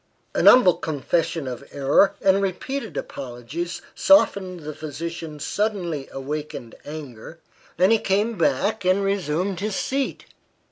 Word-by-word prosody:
A - - 0
humble 245 -9 +7
confession 160 0 -1
of 125 +1 -5
error, 145 +8 +3
and 195 0 +4
repeated 200 - -3
apologies, 140 +7 -5
softened 190 - +3
the 155 0 -6
physician's 155 0 -6
suddenly 180 -9 -2
awakened 140 -3 -5
anger, 145 -1 -8 0.4
and 185 +4 +4
he 225 - +5
came 210 +4 +1
back 195 +6 +1
and 185 +2 +2
resumed 190 -1 -1
his 205 0 -2
seat. 275 +1 -2
170 Hz, 125 wpm, -23 LUFS, 145-200 Hz, 0.4 s, humble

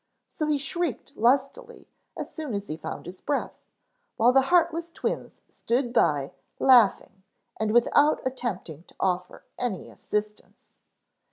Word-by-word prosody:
So 305 -4 -3
he 300 -1 +2
shrieked 340 -1 -3
lustily 275 - 0 0.3
as - - -6
soon 300 -9 -4
as 200 0 -3
he 155 - -4
found - - -7
his 180 +2 -10
breath, 290 - -2 0.6
while 235 +3 +5
the 270 - +6
heartless 340 -1 +2
twins 335 - -4
stood 240 0 -2
by 140 - +2 0.3
laughing 230 -6 +4 0.4
and 220 -1 0
without 265 +6 +4
attempting 215 - -4
to - - -21
offer 180 -1 -2 0.2
any 230 -8 -3
assistance. 210 0 -5
245 Hz, 135 wpm, -26 LUFS, 200-300 Hz, 0.6 s, the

